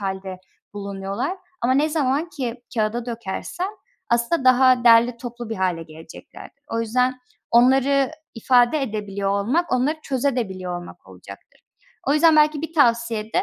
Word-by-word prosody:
hâlde 190 -1 -5 0.4
bulunuyorlar. 200 - -4 0.2
Ama 255 +2 +2
ne 295 +3 +2
zaman 300 +1 0
ki 260 -10 -4 0.2
kağıda 225 +2 -1
dökersen 235 - -4 0.4
aslında 235 +6 +1
daha 255 -1 +5
derli 235 +1 +6
toplu 240 -1 -8
bir 225 - -3
hâle 180 -3 -1
geleceklerdir. 160 - -13
O 230 - -2
yüzden 250 +3 0 0.3
onları 265 +3 +4 0.2
ifade 245 +5 +3
edebiliyor 205 -4 -3
olmak, 250 +13 0
onları 260 +5 +1
çözebiliyor 235 -10 -2
da - - -3
olmak 175 - -13
olacaktır. - - -14 0.5
O 280 - +4
yüzden 310 +1 +5
belki 300 0 +3
bir 325 - -5
tavsiye 235 -6 +2
de, - - +2
240 Hz, 145 wpm, -22 LUFS, 205-275 Hz, 0.5 s, derli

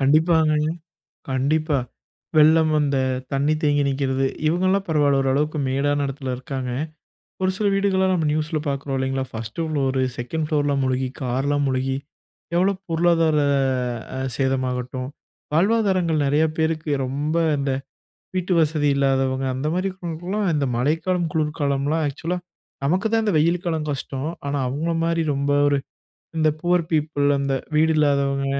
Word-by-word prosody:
கண்டிப்பாங்க, 155 +3 +4 0.8
கண்டிப்பா. 145 +3 +1 0.6
வெள்ளம் 155 +1 +6
அந்த 140 -2 +1 0.3
தண்ணீ 140 +3 +2
தேங்கி 145 -1 +3
நிற்குறது, 135 -1 0 0.2
இவங்கலாம் 185 +3 +1
பரவால, 145 -3 +3
ஓரளவுக்கு 145 +4 0
மேடான 145 +2 +1
இடத்துல 135 -1 -4
இருக்காங்க. 130 0 -5 0.7
ஒரு 185 0 +2
சில 210 - +1
வீடுகள்லாம் 190 -1 +2
நம்ப 165 -4 +1
நியூஸில 155 0 -1
பாக்குறோம் 140 0 -2
இல்லங்களா? 130 0 -1
1ஸ்ட் 115 +8 -4
ஃப்ளோர், 135 -3 0 0.2
2ண்ட் 155 +6 -2
ஃப்ளோர்லாம் 145 -2 +1
முழுகி 130 0 0
கார்லாம் 140 +3 0
முழுகி, 130 +1 -1 0.6
எவ்வளோ 190 +3 +3 0.2
பொருளாதார 165 -2 +3 0.8
அ - - -3 0.2
சேதமாகட்டும், 130 -1 -1 0.4
வாழ்வாதாரங்கள் 185 -4 +2
நெறைய 145 +3 +3
பேருக்கு 160 -1 0
ரொம்ப 145 +5 -2 0.2
இந்த 140 -1 -1 0.6
வீட்டு 185 0 0
வசதி 150 -1 +1
இல்லாதவங்க, 135 -1 +1
அந்த 135 +4 -2
மாரி 185 +2 0
இருக்கவங்களுக்குலாம் 180 +2 -3
இந்த 145 -2 +1
மழைக்காலம், 165 +7 0
குளிர்காலம்லாம் 150 0 0
ஆக்சுவலா 165 +6 -3 0.5
நமக்கு 185 +8 +1
தான் 225 -1 +2
இந்த 205 - +1
வெயில் 170 +3 +1
காலம் 160 -3 -1
கஷ்டம். 135 +1 -4 0.2
ஆனா, 145 - -1
அவங்கள 150 +6 -2
மாரி 165 0 +1
ரொம்ப 140 +1 0 0.2
ஒரு 145 0 +3 0.6
இந்த 155 -1 +4
பூர் 175 0 +2
பீப்பிள் 150 -2 +1
அந்த 140 0 -1 0.2
வீடு 160 +1 +4
இல்லாதவங்க, 140 -2 +2
150 Hz, 130 wpm, -22 LUFS, 135-165 Hz, 0.8 s, வெள்ளம்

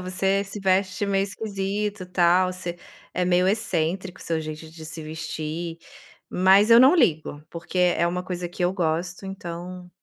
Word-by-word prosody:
Você 190 +2 0
se 200 +1 -7
veste 190 +1 +1
meio 195 -1 +1
esquisito", 200 -1 -3
tal, 180 +1 +3
"Você 175 -1 -6 0.3
é 180 - 0
meio 180 0 +3
excêntrico 185 -3 -1
seu 165 -1 -1
jeito 155 0 -7
de 160 0 -11
se 160 +1 -6
vestir", 160 +1 -5 0.5
mas 195 +4 +5
eu 230 - +9
não 265 +6 +7
ligo, 155 - +1
porque 170 +2 -5
é 175 -1 +3
uma 180 +1 -2
coisa 180 -1 -4
que 180 +1 -6
eu 175 - +2
gosto, 175 +1 -2
então 180 -1 -7
180 Hz, 160 wpm, -24 LUFS, 170-195 Hz, 0.5 s, eu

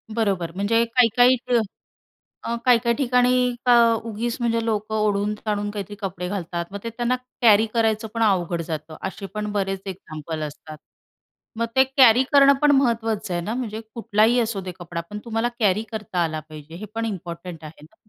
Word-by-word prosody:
बरोबर. 195 -7 0
म्हणजे 215 +4 +2
काही-काही 245 +1 +4
इथं 245 -1 +1 0.8
अ, 235 - -2
काही-काही 235 -1 +4
ठिकाणी 250 -2 +2 0.3
अं, 235 -2 +6 0.2
उगीच 230 +2 -3
म्हणजे 230 -1 0
लोकं 215 -1 -2
ओढून-ताणुन 210 0 -1
काहीतरी 205 -1 -6
कपडे 185 -2 -4
घालतात, 175 -3 -3
मग 200 - -5
ते 230 - -3
त्यांना 240 +2 -1 0.3
कॅरी 220 -2 +6
करायचं 220 -1 +1
पण 230 - -2
अवघड 175 -5 +1
जातं. 155 -1 -6
असे 195 +1 -8
पण 210 0 -3
बरेच 195 -1 -1
एक्झाम्पल 160 -4 -6
असतात. 155 +1 -8 0.8
मग 230 - +1
ते 265 - +7
कॅरी 250 -1 +7
करणं 280 0 +7
पण 295 -1 +5
महत्त्वाचं 225 -6 0
आहे 175 - -1
ना?म्हणजे, 220 +1 -4
कुठलाही 230 +1 +2
असू 220 -4 -1
दे 185 0 -6
कपडा, 170 -1 -5
पण 210 - -6
तुम्हाला 230 +1 -1
कॅरी 210 -1 +2
करता 205 -5 -2
आला 160 -1 -2
पाहिजे, 155 +1 -11
हे 200 +5 -7
पण 230 0 -1
इम्पॉर्टंट 175 -4 -6
आहे 150 -1 -11
ना? 160 +8 -18
215 Hz, 170 wpm, -23 LUFS, 180-230 Hz, 0.8 s, ते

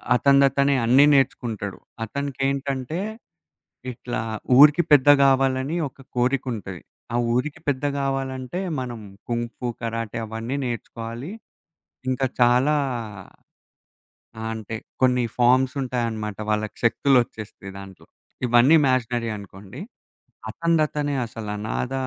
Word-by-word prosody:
అతనదతనే 140 +1 +4
అన్నీ 130 +5 +6
నేర్చుకుంటాడు. 120 -7 0 0.3
అతనికేంటంటే, 140 - -2 0.9
ఇట్లా 120 -1 -5 0.4
ఊరికి 150 +4 +8
పెద్ద 145 -1 +6
గావాలని 135 +2 +2
ఒక 135 - -18
కోరిక 125 +2 +1
ఉంటది. 95 -5 -7 0.3
ఆ - - 0 0.2
ఊరికి 130 +5 -1
పెద్ద 140 0 0
గావాలంటే, 135 +2 -3 0.2
మనం 120 -3 -5 0.3
కుంఫు, 120 +1 -3
కరాటే 115 0 -3
అవన్నీ 115 +5 -4
నేర్చుకోవాలి. 120 - -6 0.8
ఇంకా 130 +1 0 0.2
చాలా 125 +5 +4 1.6
ఆహ్, 110 - -4
అంటే 110 0 -6 0.3
కొన్ని 125 -1 +3
ఫార్మ్‌సుంటాయనమాట 125 -4 +1
వాళ్ళకి 105 0 -1
శక్తులొచ్చేస్తాయి 120 -5 0
దాంట్లో. 95 -1 -12 0.4
ఇవన్నీ 120 +6 +5
మేషనరి 120 -2 0
అనుకోండి. 100 +4 -11 0.7
అతందతనే 155 -3 0
అసలు 110 -2 -8
అనాధ 110 +5 -3
125 Hz, 95 wpm, -23 LUFS, 115-135 Hz, 1.6 s, ఊరికి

